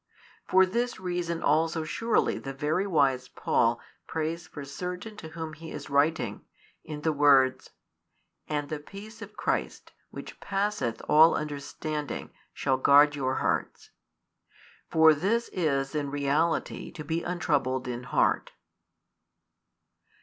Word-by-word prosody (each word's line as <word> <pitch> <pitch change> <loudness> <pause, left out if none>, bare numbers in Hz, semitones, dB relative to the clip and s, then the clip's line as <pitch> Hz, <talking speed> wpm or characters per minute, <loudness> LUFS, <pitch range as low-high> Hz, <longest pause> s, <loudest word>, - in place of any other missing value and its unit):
For 190 0 +5
this 235 +5 -2
reason 175 -2 -3
also 160 +2 +2
surely 225 +8 0
the 135 0 -7
very 155 +7 0
wise 135 -7 +2
Paul 115 0 +1 0.3
prays 160 +1 -3
for 145 -2 -8
certain 180 +9 -6
to 160 - -8
whom 160 -1 -6
he 160 +1 -10
is 145 -1 -8
writing, 140 -6 +1 0.4
in 150 -1 -7
the 160 0 +1
words: 140 -3 +4 0.8
And 145 -1 -2
the 155 - -3
peace 210 +8 -11
of 210 -1 -10
Christ, - - -2 0.2
which - - -9
passeth 200 - -2
all 160 +2 +7
understanding, 150 0 -4 0.2
shall 135 -2 0
guard 145 +2 +6
your 130 -2 -1
hearts. - - -2 1.0
For 160 -1 +6
this 205 +10 0
is 140 -6 -1
in 145 -2 -2
reality 145 +4 0
to 155 - -7
be 165 +2 -2
untroubled 145 -8 -1
in 125 0 -5
heart. - - +1
155 Hz, 130 wpm, -28 LUFS, 140-170 Hz, 1.0 s, all